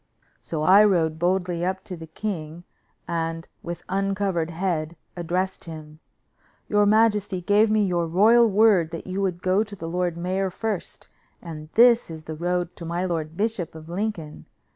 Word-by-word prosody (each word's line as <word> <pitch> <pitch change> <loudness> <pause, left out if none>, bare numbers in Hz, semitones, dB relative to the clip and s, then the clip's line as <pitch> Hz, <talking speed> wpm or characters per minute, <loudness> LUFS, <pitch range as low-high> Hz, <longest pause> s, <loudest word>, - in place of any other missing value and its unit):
So 155 -2 -4
I 195 +5 +7
rode 165 -6 +2
boldly 180 -1 0
up 190 +1 -2
to 185 - -7
the 165 -1 -10
king, 165 -2 -5 0.4
and 165 0 -3
with 175 0 -6
uncovered 195 -4 -1
head 170 -2 -2 0.2
addressed 180 +2 -2
him: 155 -2 -10 0.7
"Your 205 -1 +3
majesty 210 -3 +3
gave 205 +5 +3
me 215 -1 +3
your 175 -3 0
royal 220 +7 +5
word 200 -5 +4
that 165 0 -7
you 190 +1 -3
would 180 -2 -2
go 185 +3 +3
to 205 -2 -10
the 165 -3 -7
lord 175 0 -1
mayor 185 +2 -1
first, 210 0 -5 0.3
and 155 -3 -9
this 235 -2 +5
is 160 -1 -8
the 155 - -6
road 175 +2 -2
to - - -8
my 170 +2 -2
lord 165 -2 -3
bishop 210 -7 -2
of 160 0 -11
Lincoln. 175 - -4
180 Hz, 165 wpm, -24 LUFS, 165-200 Hz, 0.7 s, I